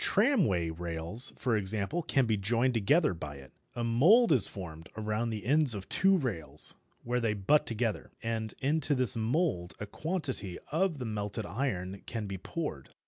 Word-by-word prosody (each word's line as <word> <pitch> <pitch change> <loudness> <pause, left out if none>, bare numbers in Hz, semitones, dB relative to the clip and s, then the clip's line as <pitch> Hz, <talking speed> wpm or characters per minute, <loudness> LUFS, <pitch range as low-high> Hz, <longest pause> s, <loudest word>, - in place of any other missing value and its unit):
Tramway 175 - +2
rails, 85 +7 -2
for 125 -4 0
example, 105 - 0
can 135 -4 +1
be 110 -2 +1
joined 115 +6 +1
together 125 - +3
by 75 -4 -7
it. 70 -1 -13 0.2
A 120 - -2
mould 165 - +5
is 130 -9 +6
formed 80 -4 -9
around 110 +2 -1
the 110 -2 -5
ends 145 -2 +3
of 100 -1 -7
two 195 +1 +4
rails, 115 - -3 0.3
where 125 +1 0
they 115 -3 0
"butt" 105 +10 +2
together, 115 -1 -1
and 110 -1 -3
into 145 +1 +1
this 130 -5 +5
mould 115 - 0
a 105 - -4
quantity 130 - -3
of 165 +1 +1
the 125 - -5
melted 105 -2 -3
iron 100 -5 -3
can 115 -2 -4
be 95 -2 -5
poured. 95 - -5
115 Hz, 170 wpm, -30 LUFS, 95-140 Hz, 0.3 s, is